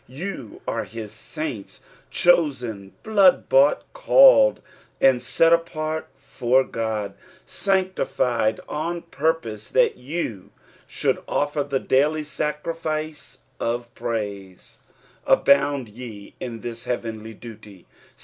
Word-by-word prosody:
You 135 - -7
are - - -1
Au 115 -1 -7
sunts 110 +2 -7 0.2
— - - -33
chosen, 125 - +2
blood 200 -4 +4
bought, 140 +2 +4
called, - - +6 0.4
and 130 -2 +4
set 165 0 +3 0.2
•part 155 -1 -3
for 125 +2 +1
God; 110 -4 -3 0.3
sanctified 155 - 0
on 170 +3 -3
purpose 125 -9 -2
that - - +3
you 125 - -5 0.4
should - - 0
ufier 145 0 -1
the 135 -1 +1
daily 150 +5 +2
Hacri&ce 155 +1 -4 0.2
of 120 0 -3
praise. 100 -5 -5 0.5
Abound 140 -2 +3
ye 110 -2 -10
in 115 -3 -6
this 115 0 -6
hearenly 110 -2 -4
duty. 105 -5 -12
130 Hz, 105 wpm, -23 LUFS, 110-155 Hz, 0.5 s, called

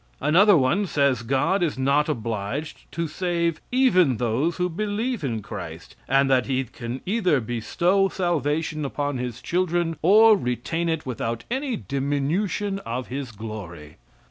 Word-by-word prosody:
Another 180 +7 +5
one 165 +10 +2
says 140 -7 +2
God 135 - +1
is 160 -6 0
not 140 +3 +2
obliged 115 +3 -4
to 165 0 -2
save 170 0 -1
even 185 - +4
those 125 +9 0
who 180 0 +1
believe 210 +4 -2
in 115 -6 -2
Christ, - - -8
and 135 +1 +3
that 130 -2 +2
he 135 -1 0
can 120 0 -7
either 185 -7 +2
bestow 170 - +1
salvation 155 -4 -1
upon 145 -1 -2
his 125 -1 -5
children 175 -2 0
or 215 +5 +7
retain 165 +3 -2
it 160 -1 -2
without 115 -2 -3
any 265 -1 -1
diminution 160 +8 -1
of 125 -6 -5
his 130 -1 -5
glory. 100 -8 -8
150 Hz, 145 wpm, -24 LUFS, 125-180 Hz, -, or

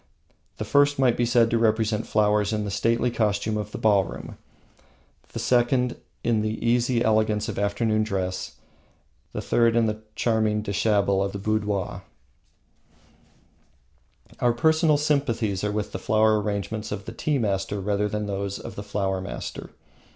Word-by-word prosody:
The 110 - -4
first 145 +4 +3
might 130 -3 +3
be 120 - +1
said 115 -1 +3
to 115 - +2
represent 110 -1 +1
flowers 105 -1 +2
in 105 -1 -1
the 100 - -4
stately 115 +4 +1
costume 105 -1 0
of 105 -1 -4
the - - -5
ballroom, 100 -5 0 1.0
the - - -7
second 125 0 +2 0.3
in 115 -2 +2
the 110 +1 -2
easy 120 0 +2
elegance 110 -1 +1
of - - -4
afternoon 110 +2 +1
dress, 95 -3 -3 0.8
the - - -5
third 115 -1 +2
in 115 -1 +3
the 110 0 -2
charming 110 -2 +1
deshabille 100 -1 +1
of 100 - -3
the - - -3
boudoir. 105 -1 -2 2.4
Our 120 -1 +3
personal 160 +4 +3
sympathies 120 -10 0
are 105 - 0
with 105 0 -3
the 95 - -5
flower 110 +1 +3
arrangements 105 +1 -3
of 100 -1 -5
the - - -6
tea 150 +4 -1
master 100 -3 -1
rather 105 +1 0
than 105 +1 -2
with - - -6
those 100 0 -3
of - - -8
the - - -6
flower 100 -2 -2
master. 95 - -6
110 Hz, 160 wpm, -25 LUFS, 100-115 Hz, 2.4 s, first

